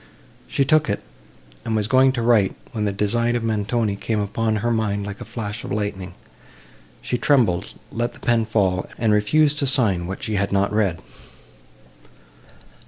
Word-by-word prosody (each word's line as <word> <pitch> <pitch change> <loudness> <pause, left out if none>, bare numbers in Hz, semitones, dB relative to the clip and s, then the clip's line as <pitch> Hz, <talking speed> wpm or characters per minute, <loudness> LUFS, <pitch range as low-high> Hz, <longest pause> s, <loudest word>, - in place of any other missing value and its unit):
She 140 - +1
took 155 -1 +3
it, 100 - -2 0.6
and 110 - -2
was 105 -1 +1
going 130 +2 +5
to 120 -3 -2
write—when 110 -1 +1
the 100 - +1
design 115 +4 0
of 120 - -1
Montoni 110 -1 0
came 110 +2 -2
upon 110 +2 -1
her 120 - +2
mind 105 -3 -1
like 100 -1 -7
a - - -6
flash 110 -1 -5
of - - -7
lightning; 100 -3 -3 0.9
she 125 - -2
trembled, 120 -12 +2 0.2
let 120 +1 -2
the - - -14
pen 120 -3 +1
fall, 95 -4 0
and 110 -2 +2
refused 145 +8 +3
to 140 - 0
sign 100 -10 +2
what 95 - -6
she 110 -2 -1
had 100 0 0
not 100 +1 +1
read. 100 -6 +1
110 Hz, 170 wpm, -22 LUFS, 100-120 Hz, 0.9 s, going